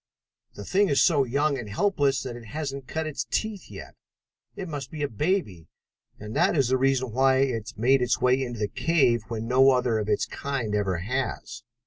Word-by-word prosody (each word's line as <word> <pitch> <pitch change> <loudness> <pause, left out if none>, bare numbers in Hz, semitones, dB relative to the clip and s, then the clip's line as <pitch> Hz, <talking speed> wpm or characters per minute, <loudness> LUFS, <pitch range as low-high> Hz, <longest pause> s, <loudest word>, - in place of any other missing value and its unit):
The 100 - -8
thing 200 0 +2
is 140 - +2
so 145 -6 +3
young 140 +3 0
and 110 -4 -7
helpless 140 - +1
that 125 -2 -6
it 120 -1 -10
hasn't 140 +1 -5
cut 160 0 -3
its 140 -6 -3
teeth 215 -3 -3
yet. - - -10 0.6
It 190 - -6
must 145 -5 -6
be 155 -2 -5
a - - +1
baby, 115 - -2 0.5
and 105 +1 -8
that - - +2
is 135 -4 +2
the 130 - +3
reason 130 -2 +1
why 130 +2 +3
it 115 -5 -1
made 130 +4 +3
its 125 -1 +1
way 125 +1 +3
into 120 -2 -4
the 105 -1 -1
cave 135 -5 +2
when 115 -1 -4
no 130 +2 +5
other 125 -4 +2
of 105 0 -3
its 105 - +1
kind 135 -7 -4
ever 100 -4 0
has." 120 +3 -4
130 Hz, 200 wpm, -26 LUFS, 115-145 Hz, 0.6 s, no